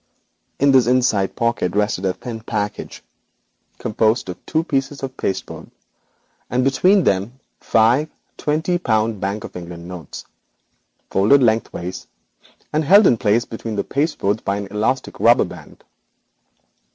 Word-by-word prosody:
In 140 0 +4
this 130 -3 +5
inside 120 -6 +2
pocket 115 -6 -1
rested 105 -2 0
a 95 - +1
thin 115 +2 -7
package, 105 -2 -4 0.7
composed 110 0 0
of 90 - -8
two 160 0 +1
pieces 135 -2 -2
of 130 -1 -5
cardboard, 95 - -4 0.8
and 125 +2 +1
between 180 +9 +3
them 95 -1 +2
rested 130 - -29 0.2
five 120 +7 +2 0.3
twenty 160 +4 -1
pound 110 - 0
Bank 100 +2 -2
of - - -9
England 85 -1 -8
notes, 90 -5 -9 0.9
folded 110 +8 +4
lengthwise, 110 -5 -1 0.7
held 180 +7 +5
in 120 - +5
place 110 +2 +2
by 110 -2 -2
an 100 -1 -5
elastic 115 +6 -1
rubber - - +5
band. - - -13
115 Hz, 125 wpm, -20 LUFS, 100-135 Hz, 0.9 s, this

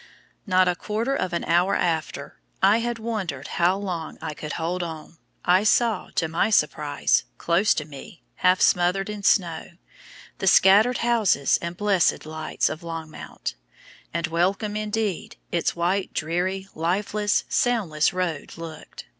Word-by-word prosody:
Not 185 -1 +4
a 180 - +1
quarter 220 +8 -2
of 185 -9 -2
an 170 - -2
hour 175 +4 +2
after 160 -4 -2 0.2
I 200 +3 +6
had 240 0 -2
wondered 205 - -4
how 175 +3 +2
long 180 -5 -5
I 160 -1 -5
could 150 +1 -6
hold 170 +2 -2
on 160 -1 -7 0.3
I 185 +3 +4
saw, 220 -1 +2
to 165 - +1
my 165 +6 +1
surprise, 150 - +1
close 175 +5 +2
to 150 - -3
me, 150 +5 -12
half 185 0 +3
smothered 180 +3 +2
in 210 -1 -6
snow, 175 -4 +1 0.7
the 190 - -2
scattered 205 +7 +6
houses 220 - +2
and 170 0 -5
blessed 200 -6 +2
lights 155 0 -2
of 155 - -4
Longmount, 165 -2 -6 0.6
and 170 0 -1
welcome, 190 +6 0
indeed, 215 -2 -2 0.2
its 170 - 0
wide, 180 +3 0
dreary, 180 +4 -2
lifeless, 205 +5 0
soundless 200 - +1
road 180 -5 -3
looked! 165 -2 -9
180 Hz, 145 wpm, -24 LUFS, 165-205 Hz, 0.7 s, I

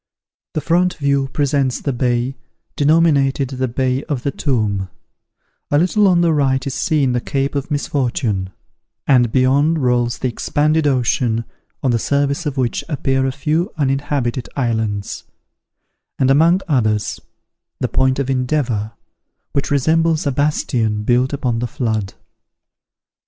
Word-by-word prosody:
The 155 - 0
front 175 +4 +1
view 140 -2 +1
presents 140 -2 0
the 140 - -2
bay, 125 +1 0 0.4
denominated 145 -3 +3
the 130 -1 -2
Bay 130 +2 -1
of 140 -5 -3
the 140 - 0
Tomb; 105 -10 -1 0.8
a 145 - +3
little 190 +6 +3
on 175 -2 +4
the 170 -2 +3
right 135 -3 +1
is 140 - -3
seen 145 -5 +1
the 125 -1 0
Cape 135 +1 -2
of 140 0 -3
Misfortune; 125 -9 -1 0.6
and 125 -4 +4
beyond 140 +6 +3
rolls 125 -3 +1
the 130 - -1
expanded 150 +5 +1
ocean, 120 -3 +1 0.4
on 130 - +2
the 115 - +1
surface 140 +5 0
of 140 -2 -4
which 125 -3 -1
appear 135 -3 0
a - - 0
few 155 - -1
uninhabited 135 -4 -1
islands; 110 -6 -2 0.9
and, 130 0 +3
among 165 +6 +4
others, 110 -8 0 0.6
the - - 0
Point 130 0 +1
of 140 -2 -1
Endeavour, 125 -5 -1 0.6
which 140 - -1
resembles 160 +3 +2
a 140 - +1
bastion 125 -6 0
built 125 +3 +2
upon 125 -5 -1
the 120 - -2
flood. 110 -6 -2
135 Hz, 140 wpm, -18 LUFS, 120-145 Hz, 0.9 s, on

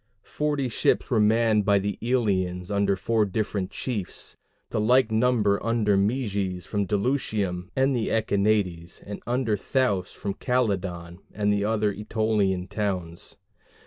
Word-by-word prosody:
Forty 145 -3 -1
ships 120 - 0
were 115 - +3
manned 110 0 +3
by 100 0 +4
the 100 +1 -2
Elians, 95 -7 0
under 100 -1 +2
four 110 +3 +1
different 100 -1 -2
chiefs; 105 -8 -4 0.4
the - - 0
like 120 +1 +4
number 110 -3 +2
under 115 -3 +2
Meges 100 -4 -1
from 100 -2 -2
Dulichium 100 -5 -1
and 135 0 +2
the 115 -3 -1
Echinades, 100 -6 0
and 100 0 -7
under 120 -3 +1
Thoas 100 -4 0
from 100 - -3
Calydon 95 -8 -2 0.2
and 105 0 +1
the 100 0 0
other 105 -1 +1
Ætolian 105 -3 0
towns. 90 -6 -4
105 Hz, 135 wpm, -25 LUFS, 95-115 Hz, 0.4 s, by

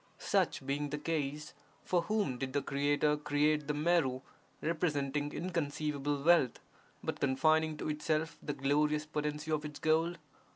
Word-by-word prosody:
Such - - 0
being 145 +2 -1
the 150 - -3
case, 150 -1 -3 0.3
for 175 -1 +2
whom 170 - -1
did 130 -1 -3
the 145 - +1
Creator 145 +2 +1
create 150 0 +1
the 150 - 0
Meru, 150 -5 +2 0.4
representing 145 -3 -1
inconceivable 145 -4 -2
wealth, 165 -7 +4 0.4
but - - -3
confining 155 +3 +2
to - - -4
itself 155 +1 -1
the 145 - -3
glorious 150 +2 +1
potency 150 0 -3
of 155 -1 0
its 150 -1 -6
gold? 160 +3 +2
150 Hz, 140 wpm, -33 LUFS, 145-155 Hz, 0.4 s, wealth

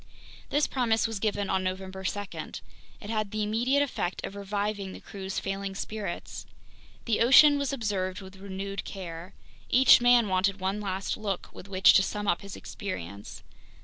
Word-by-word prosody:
This 290 +1 +2
promise 235 -4 +1
was 225 -3 -2
given 205 -1 -1
on 190 -1 0
November 190 +1 -4
2. 205 +2 -1 0.8
It 205 - -8
had 215 -2 -1
the 215 +1 -2
immediate 240 +7 +2
effect 190 -9 -3
of 195 - -7
reviving 200 -1 -3
the - - -9
crew's 195 -2 -6
failing 195 0 -3
spirits. 205 -3 -5 0.6
The 230 -3 +1
ocean 285 +5 +7
was 280 -1 -1
observed 200 -7 -2
with 190 -1 -11
renewed 195 0 -5
care. 175 -2 -8 0.3
Each 260 0 +7
man 245 -2 +5
wanted 195 +1 +1
one 190 +2 -1
last 195 -1 -2
look 200 -4 -3
with 185 - -11
which 190 -1 +6
to - - +6
sum 205 +1 -3
up 175 - +1
his 200 -1 -8
experience. 100 - -7
200 Hz, 165 wpm, -28 LUFS, 190-220 Hz, 0.8 s, ocean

